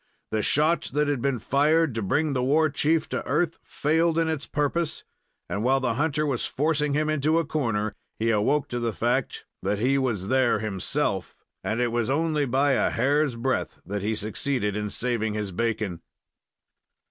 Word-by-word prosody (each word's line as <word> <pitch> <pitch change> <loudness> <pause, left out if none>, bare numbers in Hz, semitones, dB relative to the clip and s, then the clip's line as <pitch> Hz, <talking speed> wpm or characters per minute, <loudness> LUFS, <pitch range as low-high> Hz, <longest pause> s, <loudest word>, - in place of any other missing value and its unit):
The 110 - +1
shot 155 +9 +2
that 150 +1 +2
had 145 -4 0
been 140 -1 +1
fired 150 +5 +2
to 115 - -2
bring 145 +9 +1
the 130 - 0
war 150 +4 +3
chief 155 +2 +1
to - - -2
earth 170 -2 0
failed 160 +2 +1
in 165 -1 +2
its 155 -3 -3
purpose, 150 +3 -1 0.4
and 100 - -3
while 135 +2 +3
the 130 -3 0
hunter 150 +3 0
was 135 -5 -1
forcing 150 0 0
him 155 +1 +1
into 155 +1 +2
a 165 - +1
corner 115 -9 -1 0.2
he 115 +1 +1
awoke 130 +7 +2
to 120 - -2
the 115 -2 -1
fact - - -1 0.2
that 100 +2 0
he 130 +6 +2
was 115 -8 -1
there 130 -1 +3
himself, 100 -4 -2 0.3
and 110 - -1
it 120 -1 +1
was 120 0 0
only 150 0 +1
by 135 +3 +2
a 130 - +2
hair's 140 +2 +1
breadth 130 +2 -2
that 100 +2 -3
he 110 +3 -1
succeeded 105 0 -2
in 105 0 -2
saving 110 -2 -1
his 105 -2 -3
bacon. 110 -3 -2
130 Hz, 180 wpm, -26 LUFS, 110-150 Hz, 0.4 s, war